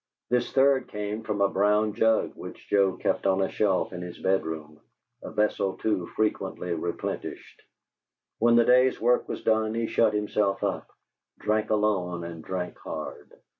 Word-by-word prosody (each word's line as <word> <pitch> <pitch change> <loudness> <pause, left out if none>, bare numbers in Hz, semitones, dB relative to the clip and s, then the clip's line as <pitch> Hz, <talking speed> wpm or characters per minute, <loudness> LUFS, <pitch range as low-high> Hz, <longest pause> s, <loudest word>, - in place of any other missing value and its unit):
This 125 -1 +1
third 135 -1 +3
came 105 +1 -4
from 105 -2 -3
a 100 - +5
brown 105 +2 +2
jug 110 +1 +2
which - - -10
Joe 100 -2 +3
kept - - 0
on 95 0 +2
a 95 - +1
shelf 95 -3 +1
in 90 - -6
his 90 0 -7
bedroom, 80 -5 -2 0.4
a - - -7
vessel 100 -3 0
too 100 -5 -1
frequently 95 -4 -1
replenished. 85 +1 -5 0.8
When 120 +1 +4
the 120 0 +5
day's 125 +1 +4
work 120 +2 +2
was - - -5
done 110 0 +1
he 115 0 0
shut 110 -1 +2
himself 105 -1 0
up, - - -2 0.5
drank 110 0 0
alone 95 -5 0
and 85 -1 -7
drank 90 -1 -4
hard. - - -7
105 Hz, 160 wpm, -27 LUFS, 95-110 Hz, 0.8 s, a